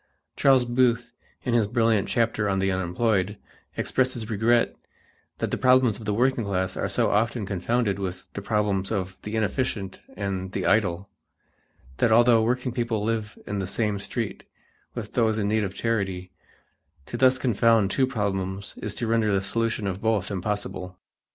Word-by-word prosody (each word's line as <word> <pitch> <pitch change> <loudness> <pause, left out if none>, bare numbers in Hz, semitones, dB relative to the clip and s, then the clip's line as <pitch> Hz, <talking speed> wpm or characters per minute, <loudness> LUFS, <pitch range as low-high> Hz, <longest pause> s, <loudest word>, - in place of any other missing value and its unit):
Charles 135 -2 +4
Booth, 120 -1 +1 0.3
in 125 - -1
his 115 -3 +3
brilliant 115 -2 +2
chapter 115 -3 +1
on 95 - +1
the 95 0 +1
unemployed, 95 +2 0 0.4
expresses 125 -4 -1
regret 115 +3 +2 0.6
that - - -2
the - - -1
problems 125 -4 +4
of 110 - -9
the 105 - 0
working 125 +1 +2
class 95 -2 -1
are - - -2
so - - +1
often 110 +1 +1
confounded 100 +2 0
with 90 -2 -4
the 100 - -5
problems 100 -2 0
of 95 -3 -3
the 105 +1 -5
inefficient 105 -2 -2 0.2
and 95 -2 -3
the - - -2
idle, 100 -3 +1 0.9
that 115 - +2
although 120 0 +6
working 125 +3 0
people 115 -3 -1
live 110 -1 -2
in 105 -1 -3
the 95 - -2
same 105 0 -1
street 100 - -4 0.5
with - - -6
those 110 -3 +2
in 100 -2 0
need 110 +1 +1
of 100 -1 -4
charity, 95 -5 -2 0.7
to - - -6
thus 130 +1 +4
confound 115 -4 +3
two 130 +4 +2
problems 100 -5 -3
is 105 - -5
to 120 - -2
render 110 -1 +2
the 100 - +3
solution 115 0 0
of 95 0 -3
both 110 -3 0
impossible. 95 -2 -4
105 Hz, 165 wpm, -25 LUFS, 100-115 Hz, 0.9 s, although